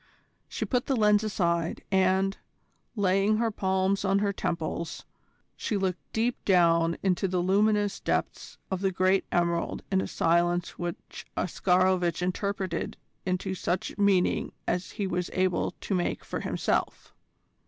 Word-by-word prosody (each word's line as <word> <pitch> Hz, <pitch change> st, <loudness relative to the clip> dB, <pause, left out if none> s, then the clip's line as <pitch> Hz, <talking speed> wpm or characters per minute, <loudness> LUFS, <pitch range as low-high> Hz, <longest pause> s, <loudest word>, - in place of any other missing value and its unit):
She -, -, -3 dB
put 250 Hz, -1 st, 0 dB
the 270 Hz, -, +2 dB
lens 210 Hz, -2 st, +4 dB
aside, 170 Hz, -5 st, -1 dB
and, 190 Hz, +1 st, +3 dB, 0.6 s
laying 200 Hz, +1 st, +2 dB
her 230 Hz, 0 st, +1 dB
palms 190 Hz, 0 st, 0 dB
on 195 Hz, 0 st, +2 dB
her 200 Hz, 0 st, +1 dB
temples, 170 Hz, -2 st, -3 dB, 0.5 s
she 210 Hz, -, -2 dB
looked 185 Hz, -2 st, -1 dB
deep 235 Hz, +2 st, -1 dB
down 170 Hz, -3 st, +3 dB
into 190 Hz, 0 st, +1 dB
the 185 Hz, 0 st, -1 dB
luminous 205 Hz, +3 st, +2 dB
depths -, -, -2 dB
of 190 Hz, -1 st, -1 dB
the 195 Hz, -, +2 dB
great 185 Hz, +1 st, +2 dB
emerald 170 Hz, -1 st, 0 dB
in 190 Hz, -1 st, +3 dB
a -, -, -3 dB
silence 175 Hz, +1 st, +1 dB
which 175 Hz, -1 st, -6 dB
Oscarovitch 180 Hz, -1 st, +2 dB
interpreted 185 Hz, -1 st, -2 dB, 0.3 s
into 185 Hz, +1 st, -1 dB
such 180 Hz, 0 st, -2 dB
meaning 200 Hz, -3 st, +2 dB
as 180 Hz, +1 st, -1 dB
he 205 Hz, -, -2 dB
was 180 Hz, -1 st, -2 dB
able 185 Hz, -1 st, 0 dB
to -, -, -3 dB
make 180 Hz, -2 st, -1 dB
for -, -, -4 dB
himself. -, -, -2 dB
185 Hz, 140 wpm, -28 LUFS, 175-200 Hz, 0.6 s, lens